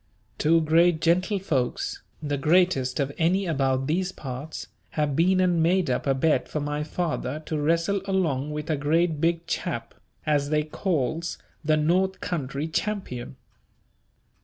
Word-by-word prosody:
Two 165 +2 +4
great 165 +1 +4
gentlefolks, 170 - 0 0.2
the 145 -1 -1
greatest 150 -3 +2
of 140 -1 0
any 180 +4 +2
about 135 -5 +1
these 180 +5 0
parts, 135 0 -6 0.3
have 150 -2 +1
been 185 +4 +3
and 180 -3 +3
made 170 -2 +2
up 125 - -1
a 135 - +3
bet 150 +4 +2
for 150 - -2
my 150 +1 -2
father 155 -3 -2
to 155 - -2
wrestle 170 +6 +1
along 160 -8 0
with 150 +1 -3
a 155 - +1
great 155 +2 +1
big 170 0 +1
chap - - -3 0.3
as 145 -2 +1
they 150 0 +2
calls 165 0 -2 0.3
the 155 0 +3
North 185 +5 +2
Country 145 -2 -3
champion. 160 - -3
155 Hz, 145 wpm, -26 LUFS, 145-175 Hz, 0.3 s, Two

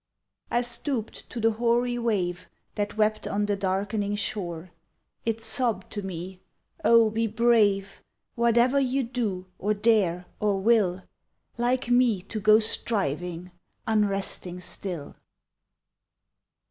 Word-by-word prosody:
I 240 +1 +1
stooped 240 -1 -2
to 240 - -6
the 225 0 +3
hoary 240 +2 +1
wave 185 -6 -1 0.2
That 205 0 -3
wept 215 0 +1
on 205 +1 0
the 205 0 0
darkening 200 +2 -1
shore. 180 -4 -3 0.6
It 225 0 -1
sobbed 225 -5 0
to 205 - -4
me: 185 0 -7 0.4
"Oh, 230 -2 +5
be 225 +1 0
brave! 210 -3 +2 0.3
Whatever 235 +3 +3
you 265 0 +1
do, 225 -7 -3
or 210 +2 0
dare, 200 -5 +2
or 205 -2 +1
will, 190 -4 +2 0.6
Like 245 +1 0
me 240 -6 +3
to 215 - -5
go 215 +1 +6
striving, 180 -6 0 0.3
unresting 195 -4 0
still." 180 -5 -5
215 Hz, 120 wpm, -26 LUFS, 190-235 Hz, 0.6 s, go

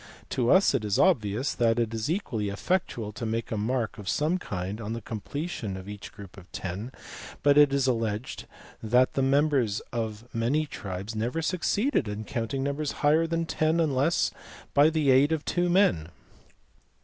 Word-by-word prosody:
To 120 -2 +1
us 190 +1 +5
it - - 0
is 105 -2 0
obvious 125 - +2
that 115 -2 +2
it 115 -1 0
is 110 +3 -2
equally 120 - -1
effectual 115 - -2
to 105 - -8
make 115 +1 -2
a - - 0
mark 115 +2 -1
of 100 -2 -5
some 160 - +1
kind 95 - -5
on 110 +1 -4
the 115 - -3
completion 110 - -5
of 95 +1 -9
each 105 0 -8
group 100 -2 -12
of 90 -2 -14
ten, 100 +7 -5 0.5
but 145 -1 +5
it 145 -1 +6
is 140 -1 +1
alleged 115 -2 -2 0.3
that 125 +3 +3
the 135 - 0
members 135 -5 +2
of 110 -1 -4
many 125 +7 +1
tribes 100 -4 -6
never 120 +9 -2
succeeded 190 - 0
in 105 +1 -4
counting 125 +2 -3
numbers 140 +1 -2
higher 160 +3 +4
than 165 0 -1
ten 160 +1 +1
unless 150 0 +2 0.4
by 145 +2 +6
the 155 -4 +2
aid 135 +4 +5
of 160 -2 -1
two 175 0 0
men. 175 - +3
125 Hz, 175 wpm, -27 LUFS, 105-150 Hz, 0.5 s, it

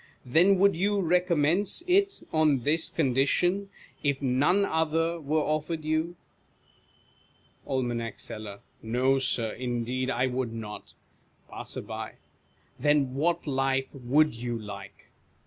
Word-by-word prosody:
Then 175 +10 +5
would 200 0 +4
you 200 +4 +1
recommence 180 - +1
it 390 +2 +2
on 155 -4 +3
this 160 +4 +1
con 140 -6 0
dition, 175 +9 +2 0.3
if 140 -2 0
none 145 +9 +2
other 165 +1 0
were 155 +2 +1
offered 155 +1 -2
you? 160 +2 0 1.5
Aim. 125 -3 -1 0.2
Seller. 105 -2 -8 0.2
ISTo, 130 +4 +2
Sir, 120 -4 0
indeed 125 +1 -2
I 125 +1 +1
would 125 -2 -2
not. 110 -2 -8 0.6
Passer. - - -6 0.9
Then 145 -1 +2
what 165 +5 0
life 135 -1 0
would 140 +4 +2
you 120 0 -4
like 105 -2 -10
145 Hz, 115 wpm, -28 LUFS, 125-165 Hz, 1.5 s, Then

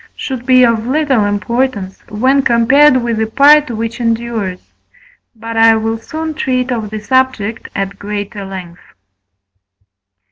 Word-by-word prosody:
should 260 -2 -6
be 255 -1 +5
of 230 -1 +1
little 270 -5 +1
importance 205 -1 -2
when 260 +6 +1
compared 260 +4 +4
with 235 -2 -2
the 220 - 0
part 290 +5 +5
which 230 0 -4
endures. 230 -5 -2 0.8
But 225 0 -7
I 225 0 +6
will 225 +1 -2
soon 315 +6 -5
treat 255 -3 -1
of 225 -4 -3
the 215 0 -5
subject 230 -1 -1
at 195 0 -4
greater 205 0 -5
length. 185 -3 -9
230 Hz, 135 wpm, -14 LUFS, 210-260 Hz, 0.8 s, I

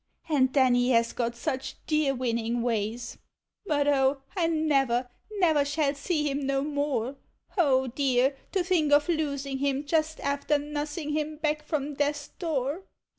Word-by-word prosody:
And 270 -5 +3
then 260 -3 +4
he 245 +1 +3
has 230 0 +2
got 235 -1 -2
such 265 +1 -3
dear 305 -3 +1
winning 235 -1 -1
ways 230 0 -2 0.2
— - - -58
but 290 -2 +1 0.4
(), - - -28
I 345 -4 +2
never, 275 -6 +1 0.3
never 325 -8 +3
shall 285 0 0
see 300 +1 -1
him 280 0 -1
no 275 0 +1
more! 285 -3 -1 0.4
O 270 -8 +3
dear! 260 +1 +1 0.2
to 380 -3 +2
think 340 -5 +1
of 290 0 +5
losing 280 -5 -1
him 280 +1 0
just 315 +1 0
after 280 +1 0
nussing 295 +1 -4
him 305 0 -1
back 300 0 0
from 300 -2 -2
death's 290 +1 -1
door! 305 -1 -2
285 Hz, 160 wpm, -27 LUFS, 260-305 Hz, 0.4 s, of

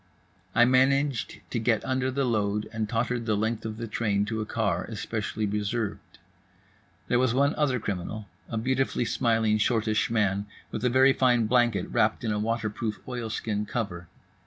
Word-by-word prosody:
I 120 - +7
managed 130 0 +2
to 120 - 0
get 110 -1 +1
under 130 0 0
the 135 +1 0
load 105 -3 0
and 110 -1 -2
tottered 120 +1 -1
the 105 -1 +2
length 110 +1 -1
of 110 0 -6
the 115 - -4
train 105 -2 0
to 110 +1 -2
a 105 - -4
car 100 -7 0
especially 110 0 -3
reserved. 105 +1 -3 0.9
There 120 - +2
was 125 -2 +2
one 140 +3 +3
other 135 -5 +1
criminal, 100 +1 -4 0.2
a 115 - -3
beautifully 130 +1 0
smiling, 115 -3 +2
shortish 110 -1 +1
man, 100 -3 +1 0.2
with - - -4
a 125 - +3
very 130 +2 +5
fine 125 -4 +3
blanket 120 -1 +2
wrapped - - +2
in 110 - 0
a 105 - 0
water 115 +1 -1
proof 105 0 -4
oilskin 110 -3 -3
cover. 95 -8 -4
115 Hz, 170 wpm, -27 LUFS, 105-125 Hz, 0.9 s, I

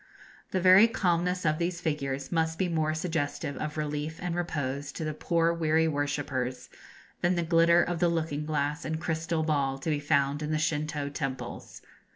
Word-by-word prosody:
The 190 - 0
very 185 +4 +8
calmness 180 -4 0
of 155 +1 +2
these 170 0 -1
figures 140 -4 -2
must 160 -1 0
be 185 - +1
more 155 -2 0
suggestive 155 -4 -2
of 155 0 -4
relief 150 +1 -3
and 180 -1 -3
repose 145 -5 -3
to - - -5
the 155 0 -2
poor 165 +2 +1
weary 160 -1 +2
worshippers 140 -4 -2 0.5
than 175 +1 +2
the 170 - 0
glitter 170 +1 +5
of 175 -1 -2
the 175 - +3
looking 160 -3 -1
glass 150 0 -1
and 160 0 -3
crystal 160 0 -1
ball 140 -4 0
to 145 +4 -2
be 150 - 0
found 145 -1 +1
in 150 - -3
the 155 - +1
Shintoo 155 -2 -1
temples. 135 -2 -5
155 Hz, 180 wpm, -28 LUFS, 145-170 Hz, 0.5 s, very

